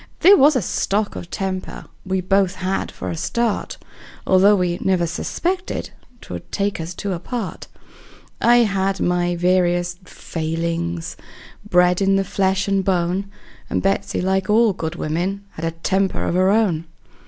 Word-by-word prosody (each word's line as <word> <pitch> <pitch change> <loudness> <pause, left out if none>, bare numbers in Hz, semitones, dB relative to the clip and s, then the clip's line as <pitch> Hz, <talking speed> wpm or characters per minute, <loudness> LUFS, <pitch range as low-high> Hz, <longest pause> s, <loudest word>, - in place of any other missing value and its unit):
There 390 +3 +8
was 295 -1 +5
a 250 - +1
stock 205 +4 -1
of 170 - -7
temper 190 -1 -4 0.2
we 190 0 0
both 190 0 +2
had 185 +1 -2
for - - -5
a - - -3
start, 230 +6 -1 0.5
Although 195 +2 +5
we 180 -2 0
never 185 -2 +2
suspected 355 - -3 0.3
'twould 85 -1 -8
take 200 -3 -1
us 165 +2 -6
two 200 +1 -3
apart; 195 +4 -5 0.7
I 240 0 +6
had 195 -1 0
my 175 0 +1
various 175 0 +1
failings, 170 0 -4 0.5
bred 180 0 +4
in 195 0 +3
the 195 - +2
flesh 190 0 0
and 195 -1 +1
bone; 185 +1 0 0.4
And - - -1
Betsey, 195 +1 0
like 190 +1 0
all 220 0 +4
good 160 -2 -4
women, 175 +6 -2
had 160 - -6
a - - +1 0.2
temper 190 0 +1
of - - -1
her 185 +1 +3
own. 195 -7 +2
185 Hz, 155 wpm, -21 LUFS, 175-200 Hz, 0.7 s, There